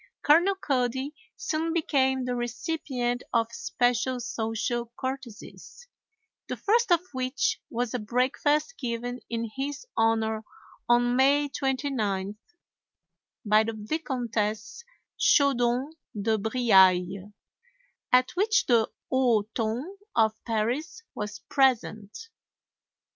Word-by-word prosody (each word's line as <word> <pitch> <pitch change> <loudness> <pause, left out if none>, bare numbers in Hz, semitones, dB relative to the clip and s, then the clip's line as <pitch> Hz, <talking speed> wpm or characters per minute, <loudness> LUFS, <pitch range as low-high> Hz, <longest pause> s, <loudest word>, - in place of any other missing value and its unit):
Colonel 345 +6 +5
Cody 265 -3 -1 0.2
soon 325 -7 -2
became 265 -5 +1
the 250 - -1
recipient 245 0 -2
of 230 -1 +1
especial 245 +2 0
social 230 +1 -3
courtesies, 260 - -7 0.6
the - - -4
first 455 0 +2
of 340 -1 +5
which 255 +1 -1
was 240 -1 -2
a 250 - -1
breakfast 265 - 0
given 245 0 -3
in 230 -1 -3
his 280 - -4
honor 220 -1 +1 0.5
on 245 0 +4
May 285 +2 +4
29th 245 -9 -2 1.1
by 215 +1 +5
the 225 +1 -3
Vicomtesse 230 - -3 0.4
Chaudon 255 0 +3 0.3
de 220 +2 +1
Briailles, 195 -4 +3 0.8
at 255 0 +4
which 410 +3 +2
the 230 -3 +3 0.2
haut 235 -5 +2
ton 230 +3 -1 0.3
of 220 -2 +4
Paris 250 - -2
was 210 0 -6
present. 260 - 0
245 Hz, 100 wpm, -27 LUFS, 225-280 Hz, 1.1 s, Colonel